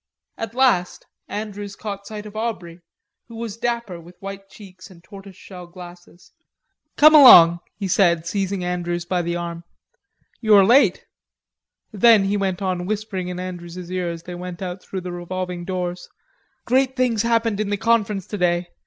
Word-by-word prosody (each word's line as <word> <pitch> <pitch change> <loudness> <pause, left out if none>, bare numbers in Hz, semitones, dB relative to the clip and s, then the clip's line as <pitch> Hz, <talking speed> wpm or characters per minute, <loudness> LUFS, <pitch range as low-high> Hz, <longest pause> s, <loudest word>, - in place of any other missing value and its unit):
At 225 0 -6
last 240 -9 +1 0.2
Andrews 205 -1 -6
caught 200 -1 -7
sight 210 -1 -8
of 210 0 -11
Aubrey, 185 -7 -5 0.5
who 230 - -12
was 225 -2 -6
dapper 235 -7 -3
with 175 +2 -16
white 195 0 -9
cheeks 190 -2 -14
and 170 -3 -17
tortoise 195 +1 -13
shell 180 -2 -12
glasses. 175 0 -14 0.7
"Come 305 +1 +7
along," 175 - +9 0.2
he 200 - -3
said, 170 -3 +2
seizing 195 +1 -2
Andrews 175 -1 -3
by 180 0 -1
the 170 0 -3
arm. 170 -1 -5 0.8
"You 215 -2 +4
are 195 -1 +7
late." 235 -3 +4 0.9
Then, 215 0 +5
he 195 +1 0
went 195 -1 -2
on, 180 -1 -2
whispering 205 -3 -3
in 180 0 -5
Andrews's 180 -1 -8
ear 180 -1 -2
as 170 -1 -7
they 180 - -8
went 180 0 -7
out 180 0 -6
through 190 - -6
the 180 0 -6
revolving 175 0 -5
doors: 180 -1 -4 0.6
"Great 260 +1 +1
things 245 -4 +1
happened 230 -2 0
in 215 -1 -2
the 205 - -1
Conference 210 -3 0
today.... 175 -3 -1
190 Hz, 165 wpm, -21 LUFS, 175-215 Hz, 0.9 s, along